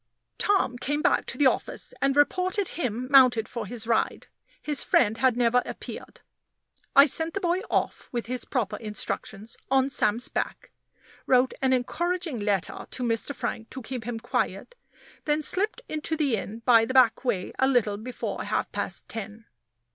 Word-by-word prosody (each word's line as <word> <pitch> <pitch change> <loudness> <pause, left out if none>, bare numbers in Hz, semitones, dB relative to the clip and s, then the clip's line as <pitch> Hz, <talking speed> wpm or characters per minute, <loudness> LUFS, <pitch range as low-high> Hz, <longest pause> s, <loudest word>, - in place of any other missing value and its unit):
Tom 375 -12 +2
came 295 +4 -1
back 355 - +2
to - - 0
the 290 - +3
office, 260 - 0
and 275 +1 +2
reported 370 +6 +2
him 250 -5 -3
mounted 250 -5 +6
for 230 -4 -5
his 230 +1 -6
ride. 230 - 0 0.3
His 295 -2 0
friend 220 -2 +2
had 255 -2 +3
never 245 0 +3
appeared. - - -9 0.7
I 275 - +9
sent 320 +4 0
the - - 0
boy 355 -1 +1
off, - - -1
with 240 -2 -3
his 250 0 -3
proper 250 -7 -2
instructions, 215 0 -5
on 270 0 +3
Sam's 230 -1 +1
back - - -4 0.6
wrote 255 0 +4
an 265 -1 +2
encouraging 340 +3 -1
letter 205 -3 -2
to 255 - -5
Mr. 235 +4 0
Frank 225 -2 -4
to 260 - -8
keep 250 0 -5
him 235 -1 -4
quiet 240 - -2 0.5
then 300 0 +1
slipped 415 +9 0
into 310 +1 -2
the 285 -6 +2
inn 220 +2 -6
by 230 -3 +6
the 260 +4 -3
back 240 -3 +5
way 210 -8 -1
a 265 - +4
little 230 -6 +2
before 240 +4 -5
half - - -1
past - - -3
ten. 220 0 -7
250 Hz, 170 wpm, -26 LUFS, 225-290 Hz, 0.7 s, I